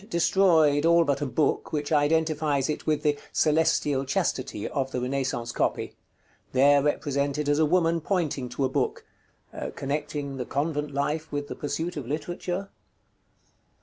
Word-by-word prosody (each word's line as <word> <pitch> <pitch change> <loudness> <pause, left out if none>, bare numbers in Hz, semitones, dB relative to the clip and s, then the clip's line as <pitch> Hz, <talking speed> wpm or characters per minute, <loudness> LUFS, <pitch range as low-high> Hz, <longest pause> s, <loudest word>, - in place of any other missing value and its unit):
_ - - -22
Destroyed, 165 -5 +4
all 170 +1 +5
but 145 -3 0
a 145 - 0
book, 145 +2 0
which 150 -1 -2
identifies 150 -2 +2
it - - -6
with 155 -1 +1
the 145 -1 +1
"Celestial 150 -3 +2
Chastity" 135 - -2
of 135 -2 -2
the 125 - -3
Renaissance 125 -2 -2
copy; - - -1 0.6
there 140 +2 +5
represented 145 0 -1
as 145 +1 +2
a 155 - +4
woman 165 0 +2
pointing 155 -8 -1
to 130 +3 -1
a - - +3
book 130 - -2 0.7
(connecting 140 0 -3
the 125 - -3
convent 150 +1 -2
life 150 +3 -2
with 145 0 -3
the - - -5
pursuit 160 +3 -3
of 135 -5 -5
literature?). 175 +6 -4
145 Hz, 150 wpm, -26 LUFS, 140-160 Hz, 0.7 s, all